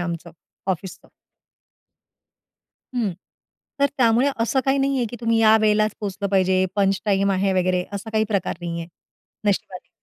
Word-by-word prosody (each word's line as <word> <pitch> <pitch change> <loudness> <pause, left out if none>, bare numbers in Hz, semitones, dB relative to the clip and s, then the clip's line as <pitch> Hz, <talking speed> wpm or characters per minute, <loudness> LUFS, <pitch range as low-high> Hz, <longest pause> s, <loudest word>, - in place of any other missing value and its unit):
आमचं 170 -1 -4 0.4
ऑफिसचं. 185 0 -5 1.9
हं, 225 -7 0 0.7
तर 280 - +6
त्यामुळे 240 +2 +4
असं 235 +4 +2
काही 270 +1 +2
नाही 275 0 +1
आहे 240 - 0
की 240 - -7
तुम्ही 230 -1 +2
या 220 0 +6
वेळेलाच 215 0 +2
पोहोचलं 200 -1 -3
पाहिजे, 185 -1 +3
पंच 195 -1 +2
टाईम 200 -1 +2
आहे 190 +1 +1
वगैरे 185 -1 +1
असा 200 +2 -5
काही 220 0 +2
प्रकार 200 -3 -1
नाही 170 -1 -4
आहे 165 - -7 0.6
नशिबाने. 190 -2 -2
200 Hz, 150 wpm, -22 LUFS, 185-225 Hz, 1.9 s, तर